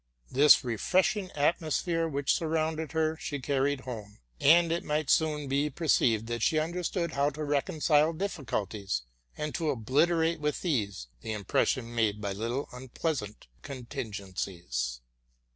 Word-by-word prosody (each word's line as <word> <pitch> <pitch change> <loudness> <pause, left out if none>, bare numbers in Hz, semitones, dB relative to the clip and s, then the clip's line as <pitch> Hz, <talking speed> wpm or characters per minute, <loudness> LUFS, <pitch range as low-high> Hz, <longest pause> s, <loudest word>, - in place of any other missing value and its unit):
This 145 +2 +7
refreshing 185 - +1
atmosphere 165 +2 +1
which 140 -3 0
sure 165 - 0
rounded 160 -1 -1
her 160 0 +1
she 145 - -4
carried 140 0 0
home; 110 -5 -8 0.2
and 165 +3 +6
it 170 +1 0
might 150 -1 0
soon 150 -2 +2
be 140 +2 +1
per 160 +4 -6
ceived 115 -7 +3
that 120 0 -3
she 155 - +2
understood 170 +1 -1
how 140 0 +2
to 150 +2 -6
reconcile 150 +2 +2
difficulties, 110 - -3 0.3
and 150 0 -3
to 160 -3 -1
obliterate 160 +7 +2
with 150 +4 -2
ease 105 - -1 0.2
the 110 - -4
impression 115 +4 0
made 110 -3 +1
by 100 -2 -3
little 115 +7 -3
unpleas 130 +4 -2
ant 105 +1 -10 0.2
contingencies. 95 - -4
145 Hz, 145 wpm, -29 LUFS, 115-160 Hz, 0.3 s, This